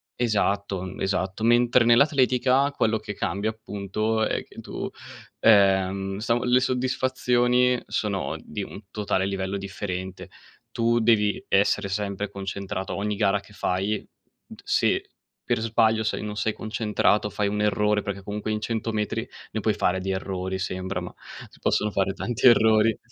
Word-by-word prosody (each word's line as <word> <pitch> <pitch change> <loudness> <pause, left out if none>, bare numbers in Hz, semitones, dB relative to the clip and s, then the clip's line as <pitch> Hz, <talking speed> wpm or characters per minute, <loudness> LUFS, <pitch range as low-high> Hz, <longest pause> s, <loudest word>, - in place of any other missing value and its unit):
esatto, 100 -4 0
mhmm, 95 0 -7
esatto. 95 +2 -1
Mentre 120 +1 +4
nell'atletica 130 +1 +4
quello 110 -5 +1
che 105 - -6
cambia 100 +3 -1
appunto, 110 0 -2
è - - -2
che - - -14
tu, - - -5 0.5
ehm, 95 -2 +3
sa 115 +2 +1
le 125 +1 +4
soddisfazioni 125 -1 +1
sono 100 -3 -2
di - - -6
un - - -8
totale 100 -3 -1
livello 95 0 -2
differente. 95 -1 -5 0.4
Tu 115 0 +2
devi 110 -3 +2
essere 100 +1 +2
sempre 100 0 -3
concentrato 95 -1 -5
ogni 105 +1 -2
gara 100 -1 +2
che 100 +1 -17
fai, 100 +2 -1
n - - -18
t - - -17
se - - +1 0.4
per - - +1
sbaglio 110 -1 +2
sei 110 - -2
non 105 0 -5
sei 110 +1 0
concentrato, 105 -1 0
fai 105 0 -1
un 105 +1 -1
errore, 105 0 +2
perché 100 -1 -5
comunque 105 +2 -4
in 110 - -1
100 115 +1 -2
metri 105 -2 -2 0.3
ne - - -3
puoi - - +2
fare 95 +1 0
di 95 - -2
errori, 95 0 -3
sembra, 95 0 -3
ma 90 0 -7 0.3
si - - -21
possono 105 - +1
fare 95 -1 0
tanti 120 +5 +1
errori. 110 -1 +5
105 Hz, 155 wpm, -25 LUFS, 95-115 Hz, 0.5 s, errori